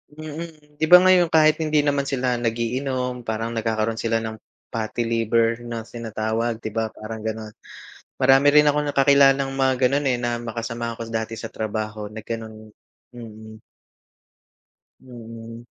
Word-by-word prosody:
Mm 155 -1 -9
di 155 - +2
ba 180 +2 +9
ngayon 185 -2 +5
kahit 155 -1 +4
hindi 155 -2 +1
naman 140 -1 0
sila 125 -3 -1
nag-iinom 125 +2 -2
parang 110 +1 -2
nagkakaroon 110 -1 -1
sila 115 0 0
ng 110 -1 -6 0.3
fatty 115 +1 -2
liver 115 0 +1
na 115 -1 -5
tinatawag, 115 0 -3
'di 110 - -4
ba 110 +1 -1
parang 110 +1 -7
ganun. 110 -1 -5 0.7
Marami 135 +2 +5
rin 150 +1 +6
akong 150 0 +1
kakilalang 135 0 +4
mga 135 -1 +2
ganon 140 +2 0
eh, 125 - 0
na 120 -1 -1
mga 115 0 -6
kasamahan 115 0 -4
ko - - -5
dati 115 0 -3
sa 115 - -7
trabaho 110 -1 -4
na 110 - -9
ganun, 110 -1 -7 0.4
mm. 110 -2 -11 1.4
Mm. 115 -2 -10
115 Hz, 150 wpm, -23 LUFS, 110-135 Hz, 1.4 s, ba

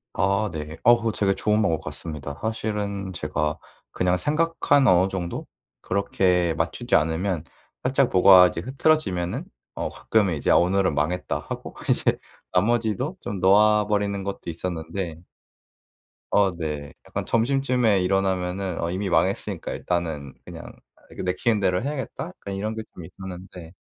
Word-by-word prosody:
아, 100 +3 +1
네. 75 +1 -6
어, 120 - +8
그거 115 -1 -1
되게 100 -2 +1
좋은 105 +2 +1
방법 85 -6 +1
같습니다. 75 -3 -6
사실은 105 -3 -3
제가 75 -3 -2 0.3
그냥 90 0 +1
생각한 150 - +2
어느 90 +1 +5
정도? 90 -3 -4 0.3
그렇게 90 -3 +1
맞추지 85 +10 -3
않으면 80 +2 +1 0.4
살짝 130 0 +2
뭐가 90 0 +8
이제 85 - -5
흐트러지면은 130 - 0 0.3
어 - - -3
가끔 105 -3 +1
이제 80 -5 0
'오늘은 95 0 +3
망했다.'하고 80 +5 -3 0.2
이제 - - +2 0.3
나머지도 120 - +1
좀 100 -1 -4
놓아버리는 105 0 +3
것도 95 -3 -5
있었는데. 85 0 -5 1.1
어. 95 -3 +3
네. 75 -3 -5
약간 - - -4
점심쯤에 125 -4 +2
일어나면은 95 -1 0
'어 85 - -1
이미 95 +2 -2
망했으니까 - - 0
일단은 80 -6 -3
그냥 - - -9 0.5
내키는 105 +5 +1
대로 90 0 +1
해야겠다.' 140 -3 -4
약간 95 +2 -8
이런 105 +3 -3
게 110 - -4
좀 90 - -9
있었는데. 90 -1 -10
95 Hz, 315 characters per minute, -24 LUFS, 85-105 Hz, 1.1 s, 어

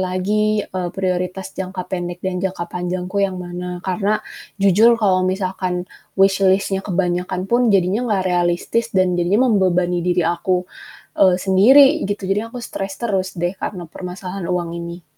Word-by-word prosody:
lagi, 205 +3 0
eee, 185 -1 -4
prioritas 185 0 -2
jangka 185 0 -5
pendek 175 -1 -3
dan 180 -1 -2
jangka 185 -2 -2
panjangku 180 +2 -4
yang 195 -2 0
mana, 180 0 -6
karena 195 +2 0 0.4
jujur 210 +4 +5
kalau 195 -4 +2
misalkan 185 -1 -2 0.3
wishlist-nya 195 0 +3
kebanyakan 180 -1 -2
pun 240 +4 +2
jadinya 200 +4 +2
gak 195 -4 +1
realistis 180 +5 0
dan 185 -1 +3
jadinya 200 +9 +2
membebani 180 -3 +2
diri 175 0 +1
aku, 180 +2 0 0.6
eee, 185 -2 +6
sendiri, 245 +9 +6
gitu. 205 -1 -3
Jadi 195 +2 0
aku 230 - -10
stress 195 -2 -5
terus 195 -5 -1
deh 175 +1 -1
karena 180 -4 -4
permasalahan 180 +2 -7
uang 175 -2 -2
ini. 170 0 -8
185 Hz, 145 wpm, -20 LUFS, 180-195 Hz, 0.6 s, eee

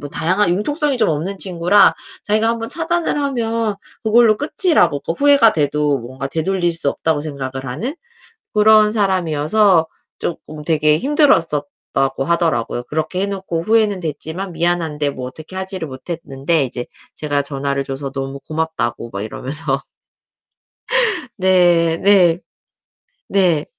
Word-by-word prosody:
뭐 145 - -7
다양한 180 +6 +1
융통성이 280 - 0
좀 220 - +2
없는 165 +6 -2
친구라 185 +2 +3 0.3
자기가 215 +2 +2
1 230 0 0
번 225 0 -5
차단을 335 +2 -1
하면 230 -6 -1 0.3
그걸로 225 0 +4
끝이라고 290 - +3
더 - - -1
후회가 280 +1 +5
돼도 150 -1 +1
뭔가 130 +3 -6
되돌릴 175 +3 0
수 165 -4 -1
없다고 160 0 -1
생각을 135 -3 -5
하는 165 - -4 0.6
그런 215 0 +5
사람이어서 185 -2 +2 0.3
쪼끔 155 -2 -6
되게 150 -1 +2
힘들었었다고 160 - +1
하더라고요. 135 -7 0
그렇게 155 +7 -3
해 - - +1
놓고 190 -4 -3
후회는 215 -1 +2
됐지만 165 +4 -5
미안한데 165 -3 0
뭐 130 -2 -7
어떻게 155 +7 -11
하지를 190 -3 -3
못했는데 140 +1 -2
이제 125 -1 -5 0.3
제가 145 -2 -1
전화를 140 0 -2
줘서 135 0 -5
너무 135 0 -5
고맙다고 140 -6 -3
막 100 - -5
이러면서. 135 +5 -3 1.5
네. 175 -4 +3
네. 185 -4 +4 0.9
네. 175 -6 +2
165 Hz, 310 characters per minute, -18 LUFS, 145-205 Hz, 1.5 s, 후회가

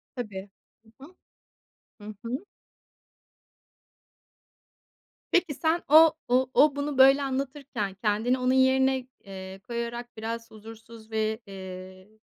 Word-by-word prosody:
Tabii. 205 -5 -6 0.5
Hı 270 - -11
hı. 355 +4 -18 0.9
Hı 210 0 -8
hı. 240 +3 -2 2.9
Peki 355 -4 +2
sen 325 +4 0
o 315 +1 +8
o 255 +1 +2
o 290 -1 +5
bunu 285 -1 -3
böyle 270 +2 +6
anlatırken 265 -6 -3
kendini 220 +5 0
onun 255 +1 +1
yerine, 265 0 +3 0.2
eee, 190 -1 -9
koyarak 235 0 -5
biraz 230 +1 -5
huzursuz 225 +1 -13
ve, 220 0 -1
eee, 185 0 -10
235 Hz, 110 wpm, -27 LUFS, 215-265 Hz, 2.9 s, o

